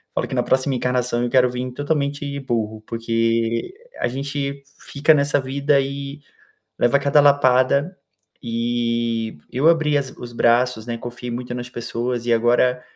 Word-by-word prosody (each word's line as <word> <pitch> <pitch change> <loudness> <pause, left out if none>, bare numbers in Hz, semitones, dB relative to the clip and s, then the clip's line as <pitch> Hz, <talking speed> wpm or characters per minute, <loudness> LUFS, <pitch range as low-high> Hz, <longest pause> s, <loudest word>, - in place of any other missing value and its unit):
Falo - - -1
que - - -5
na 125 - +1
próxima 130 +2 +1
encarnação 125 -1 0
eu 120 - 0
quero 125 0 +4
vim 125 +1 -4
totalmente 145 0 -2
burro, 110 -4 -3
porque 115 - -1 0.3
a - - +1
gente 140 +2 -4 0.2
fica 145 +3 +1
nessa 145 0 +2
vida 140 +2 +1
e 140 +1 -6 0.6
leva 130 +4 +3
cada 140 +1 +3
lapada. 140 +3 +3 0.4
E 115 -2 -1
eu 135 +5 +2
abri 160 -3 +3
as 135 -2 -3
os 120 -1 -8
braços, 120 -1 +2
né, 120 -1 -4
confiei 120 +1 -7
muito 120 +1 -5
nas 125 0 -5
pessoas 120 0 -3
e 120 - 0
agora, 120 +2 +3
125 Hz, 155 wpm, -21 LUFS, 120-140 Hz, 0.6 s, quero